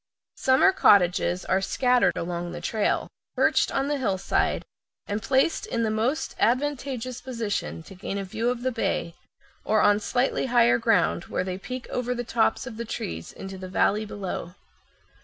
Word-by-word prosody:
Summer 265 Hz, +9 st, +5 dB
cottages 180 Hz, -, +3 dB
are 190 Hz, +1 st, +1 dB
scattered 250 Hz, +4 st, +2 dB
along 175 Hz, 0 st, -3 dB
the 175 Hz, -, -5 dB
trail, 215 Hz, +4 st, 0 dB, 0.3 s
perched -, -, +3 dB
on 270 Hz, 0 st, 0 dB
the 290 Hz, -1 st, -1 dB
hillside, 195 Hz, -7 st, 0 dB, 0.4 s
and 205 Hz, +1 st, -3 dB
placed 270 Hz, -, +1 dB
in 230 Hz, -, -1 dB
the 220 Hz, -, 0 dB
most 235 Hz, +8 st, -1 dB
advantageous 255 Hz, -1 st, -1 dB
position 230 Hz, -9 st, -3 dB
to 195 Hz, -, -12 dB
gain 195 Hz, +1 st, -5 dB
a 200 Hz, -, -2 dB
view 220 Hz, +5 st, -2 dB
of 245 Hz, -1 st, -3 dB
the 260 Hz, -, +1 dB
bay, 170 Hz, -7 st, -2 dB, 0.5 s
or 215 Hz, -, +2 dB
on 205 Hz, 0 st, +4 dB
slightly 250 Hz, +4 st, 0 dB
higher 240 Hz, -1 st, +4 dB
ground, 225 Hz, -6 st, +2 dB
where -, -, -2 dB
they 185 Hz, 0 st, -4 dB
peek 255 Hz, +5 st, -6 dB
over 250 Hz, 0 st, -2 dB
the 245 Hz, -, -3 dB
tops 230 Hz, -1 st, +1 dB
of 235 Hz, -4 st, -8 dB
the 235 Hz, -, -3 dB
trees 85 Hz, -, -5 dB
into 190 Hz, 0 st, -8 dB
the 185 Hz, 0 st, -7 dB
valley 205 Hz, +3 st, +2 dB
below. 190 Hz, -4 st, -5 dB
225 Hz, 170 wpm, -26 LUFS, 190-250 Hz, 0.5 s, Summer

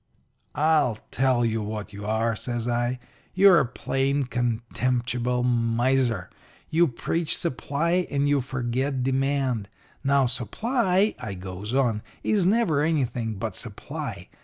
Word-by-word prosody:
"'I'll 150 Hz, -7 st, +3 dB
tell 130 Hz, -2 st, +2 dB
you 115 Hz, -1 st, 0 dB
what 105 Hz, 0 st, -5 dB
you 100 Hz, +1 st, -7 dB
are,' 110 Hz, +1 st, +1 dB
says 120 Hz, +1 st, -3 dB
I. 120 Hz, +1 st, 0 dB, 0.4 s
'You're 190 Hz, -2 st, +7 dB
a 135 Hz, -, +1 dB
plain, 135 Hz, +3 st, 0 dB
contemptible 125 Hz, 0 st, -1 dB
miser. 120 Hz, -3 st, +1 dB, 0.4 s
You 170 Hz, +2 st, +4 dB
preach 155 Hz, +5 st, -1 dB
supply 170 Hz, +4 st, 0 dB
and 140 Hz, 0 st, +1 dB
you 145 Hz, -1 st, +3 dB
forget 130 Hz, +1 st, -2 dB
demand. 135 Hz, -5 st, 0 dB, 0.3 s
Now, 140 Hz, -1 st, +3 dB
supply,' 195 Hz, -, +1 dB
I 100 Hz, -3 st, -5 dB
goes 95 Hz, +5 st, -5 dB
on, 120 Hz, -6 st, +2 dB, 0.2 s
'is 200 Hz, -5 st, +2 dB
never 200 Hz, -9 st, +3 dB
anything 125 Hz, -8 st, 0 dB
but 95 Hz, -, -4 dB
supply. -, -, -6 dB
125 Hz, 125 wpm, -25 LUFS, 115-145 Hz, 0.4 s, You're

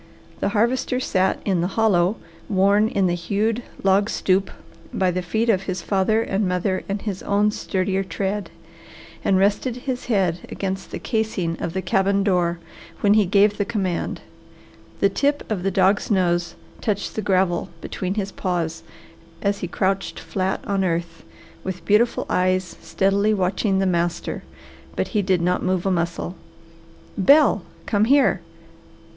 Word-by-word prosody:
The -, -, 0 dB
Harvester 250 Hz, +3 st, +1 dB
sat 190 Hz, -6 st, +1 dB
in 185 Hz, -4 st, +1 dB
the 175 Hz, -, +1 dB
hollow 200 Hz, -3 st, +3 dB, 0.3 s
worn 200 Hz, +2 st, +4 dB
in 200 Hz, -3 st, +1 dB
the 175 Hz, -, +2 dB
hewed 210 Hz, +6 st, -1 dB, 0.2 s
log 195 Hz, +2 st, +3 dB
stoop 190 Hz, +1 st, +1 dB, 0.4 s
by 185 Hz, -1 st, +1 dB
the 185 Hz, +1 st, -2 dB
feet 220 Hz, +6 st, -1 dB
of 200 Hz, -5 st, +3 dB
his 185 Hz, -2 st, -3 dB
father 215 Hz, +3 st, +2 dB
and 195 Hz, -1 st, 0 dB
mother 185 Hz, +1 st, -1 dB
and 200 Hz, +1 st, -1 dB
his 200 Hz, -4 st, -4 dB
own 205 Hz, +1 st, +2 dB
sturdier 190 Hz, -1 st, -1 dB
tread, 195 Hz, +3 st, -3 dB, 0.7 s
and 190 Hz, -, +3 dB
rested 205 Hz, +5 st, +1 dB
his 250 Hz, 0 st, -4 dB
head 190 Hz, -7 st, +1 dB
against 190 Hz, -1 st, -4 dB
the -, -, -5 dB
casing 215 Hz, -7 st, -1 dB
of 165 Hz, -, -3 dB
the 190 Hz, -, -2 dB
cabin 195 Hz, +1 st, +2 dB
door 175 Hz, -3 st, +1 dB, 0.4 s
when 205 Hz, 0 st, +5 dB
he 210 Hz, -3 st, +4 dB
gave 205 Hz, +2 st, +3 dB
the -, -, +3 dB
command. 190 Hz, -4 st, -2 dB, 0.8 s
The 200 Hz, -, +5 dB
tip 285 Hz, +8 st, 0 dB
of 200 Hz, -4 st, -1 dB
the 195 Hz, -, 0 dB
dog's 190 Hz, +2 st, +2 dB
nose 175 Hz, -4 st, +1 dB, 0.3 s
touched 205 Hz, -2 st, -2 dB
the 215 Hz, -, -2 dB
gravel 185 Hz, -2 st, +1 dB
between 185 Hz, +2 st, -4 dB
his 200 Hz, -2 st, -2 dB
paws 170 Hz, -4 st, -2 dB, 0.6 s
as 200 Hz, 0 st, +1 dB
he 180 Hz, -, -3 dB
crouched 195 Hz, +2 st, -1 dB
flat 190 Hz, 0 st, -2 dB
on 195 Hz, -1 st, 0 dB
earth, 170 Hz, -2 st, -2 dB, 0.4 s
with 185 Hz, -1 st, -5 dB
beautiful 220 Hz, +3 st, +2 dB
eyes 185 Hz, -1 st, 0 dB
steadily 200 Hz, +2 st, +1 dB
watching 190 Hz, +1 st, +1 dB
the 195 Hz, -, +2 dB
master, 175 Hz, -1 st, -1 dB, 0.5 s
but -, -, -1 dB
he 210 Hz, -, +1 dB
did 185 Hz, -3 st, +1 dB
not 180 Hz, +1 st, +1 dB
move 185 Hz, -1 st, 0 dB
a 195 Hz, -, +2 dB
muscle. 170 Hz, 0 st, -2 dB, 0.8 s
"Bel, 280 Hz, +1 st, +5 dB, 0.2 s
come 205 Hz, 0 st, +2 dB
here!" 275 Hz, +3 st, +4 dB
195 Hz, 155 wpm, -22 LUFS, 185-210 Hz, 0.8 s, when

